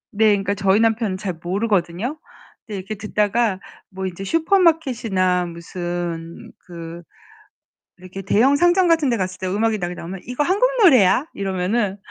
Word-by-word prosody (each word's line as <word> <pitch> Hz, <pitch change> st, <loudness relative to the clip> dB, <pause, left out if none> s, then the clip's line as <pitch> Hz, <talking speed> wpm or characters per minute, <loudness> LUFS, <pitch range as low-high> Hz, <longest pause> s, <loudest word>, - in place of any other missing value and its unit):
네, 220 Hz, +1 st, +4 dB
그러니까 200 Hz, -1 st, +1 dB
저희 195 Hz, 0 st, +2 dB
남편은 225 Hz, -3 st, +1 dB
잘 190 Hz, -2 st, -4 dB
모르거든요? 200 Hz, -, -1 dB, 0.5 s
그런데 210 Hz, -3 st, -5 dB
이렇게 195 Hz, +3 st, -6 dB
듣다가 210 Hz, 0 st, 0 dB, 0.3 s
뭐 190 Hz, -1 st, -6 dB
이제 185 Hz, +1 st, -5 dB
슈퍼마켓이나 250 Hz, -, +1 dB
무슨 170 Hz, -1 st, -6 dB
그 170 Hz, -1 st, -9 dB, 1.0 s
이렇게 185 Hz, +1 st, -9 dB
대형 235 Hz, +8 st, +3 dB
상점 350 Hz, +3 st, +3 dB
같은데 300 Hz, -8 st, +2 dB
갔을 185 Hz, -2 st, -4 dB
때 185 Hz, -, -3 dB
음악이 215 Hz, +3 st, 0 dB
나오면 180 Hz, +1 st, -6 dB
"이거 250 Hz, +4 st, -1 dB
한국 400 Hz, +10 st, +2 dB
노래야?" 250 Hz, -, +5 dB
이러면은 195 Hz, +2 st, -1 dB
200 Hz, 330 characters per minute, -21 LUFS, 185-240 Hz, 1.0 s, 노래야